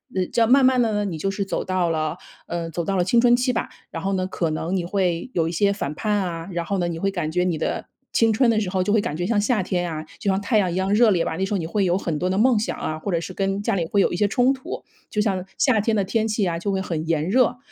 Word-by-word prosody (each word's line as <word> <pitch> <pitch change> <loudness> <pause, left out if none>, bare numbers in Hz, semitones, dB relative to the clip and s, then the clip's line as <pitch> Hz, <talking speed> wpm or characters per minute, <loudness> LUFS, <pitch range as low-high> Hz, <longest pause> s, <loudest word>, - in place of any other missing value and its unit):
呃， 185 - +2
这 - - -2
样 230 -1 +4
慢 270 +1 +6
慢 260 0 +4
地 225 -3 +2
呢， 205 0 0
你 180 -5 -3
就 195 +5 -1
是 200 0 -2
走 195 - -2
到 185 -2 0
了 155 -1 -1 0.3
嗯， 165 -1 -4
走 170 +1 -3
到 195 - -1
了 180 - +2
青 235 +6 +3
春 240 0 +5
期 250 +1 +1
吧， 235 - -2 0.2
然 165 - -6
后 195 - 0
呢， 185 -1 0
可 170 -3 -2
能 165 +4 -2
你 180 -2 -1
会 185 +4 -1
有 165 -2 +1
一 - - -3
些 200 +4 +2
反 150 -7 -4
叛 210 +3 0
啊， 170 -4 -2
然 170 - -1
后 195 +4 -2
呢， 175 -2 0
你 165 -1 -4
会 195 +3 +1
感 175 -5 -3
觉 180 +1 +1
你 175 -3 0
的 - - -3 0.3
青 225 -1 +4
春 235 +2 +3
的 215 - +2
时 205 - -2
候 185 0 0
就 205 +3 0
会 220 - +4
感 150 - -3
觉 175 - -2
像 210 0 +1
夏 215 -2 +1
天 175 -1 -1
啊， 155 0 -4 0.2
就 200 - -1
像 190 0 +2
太 210 +2 +2
阳 185 -3 +1
一 - - -3
样 190 +2 0
热 225 +1 +5
烈 175 -4 +2
吧。 160 - -3
那 190 - -1
时 200 +2 -1
候 - - +2
你 165 - -3
会 195 +4 0
有 180 0 +2
很 165 -6 -2
多 180 - 0
的 190 - 0
梦 235 -1 +4
想 220 - -3
啊， 155 0 -3
或 200 - -4
者 170 - +1
是 175 +2 -7
跟 195 +1 -1
家 - - 0
里 185 -4 0
会 200 - +1
有 195 - +3
一 - - -1
些 205 +3 +2
冲 250 +6 +3
突， 260 -1 -7 0.3
就 210 - -3
像 195 -4 0
夏 250 -6 +3
天 220 +1 +1
的 200 - +2
天 220 +3 0
气 215 -3 0
啊， 165 -1 -2
就 200 +3 -2
会 195 - 0
很 165 -4 -3
炎 160 -1 0
热。 250 +4 +3
195 Hz, 345 characters per minute, -23 LUFS, 170-210 Hz, 0.3 s, 慢